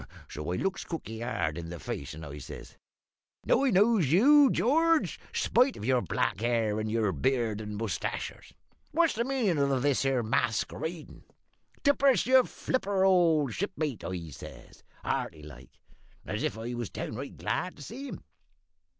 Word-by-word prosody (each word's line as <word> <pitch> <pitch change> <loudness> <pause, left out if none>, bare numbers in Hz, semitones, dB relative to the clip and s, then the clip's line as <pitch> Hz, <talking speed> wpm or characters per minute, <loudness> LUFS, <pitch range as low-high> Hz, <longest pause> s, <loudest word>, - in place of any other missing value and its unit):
So 75 +3 -5
I - - 0
looks 195 - -2
cookie 115 -10 -6
hard 85 -9 -2
in 85 -1 -7
the 85 -1 -7
face, 75 +1 -5
and 80 0 -8
I 70 0 -8
says - - -10 0.7
"`Now 275 - +3
I - - +4
knows 200 - +3
you, 275 - +7
George, 325 +8 +2
spite 255 +2 +2
of - - -6
your 130 0 +3
black 95 - -1
hair 115 -2 +1
and 110 - -2
all - - -3
your 110 -3 +1
beard 110 - 0
and 105 -1 -6
mustachers. 105 -6 -4 0.4
What's 330 +1 +3
the 235 - 0
meanin' 235 - 0
of 130 -1 0
this 145 -2 +2
here 135 -3 +1
maskeradin'? 150 +9 -2 0.6
Tip 285 -1 +3
us 270 -8 +4
your 255 +1 +6
flipper, 200 -6 -1
old 165 - +3
shipmate,' 155 - -3
I 85 -4 -5
says, - - -12 0.2
hearty 75 - -3
like, 65 -5 -13 0.5
and - - -4
as - - -3
if - - -1
I 115 +2 -5
was 120 -3 -4
downright 130 +5 -6
glad 180 0 -2
to 145 - -11
see 265 - -7
him. - - -8
135 Hz, 170 wpm, -29 LUFS, -, 0.7 s, you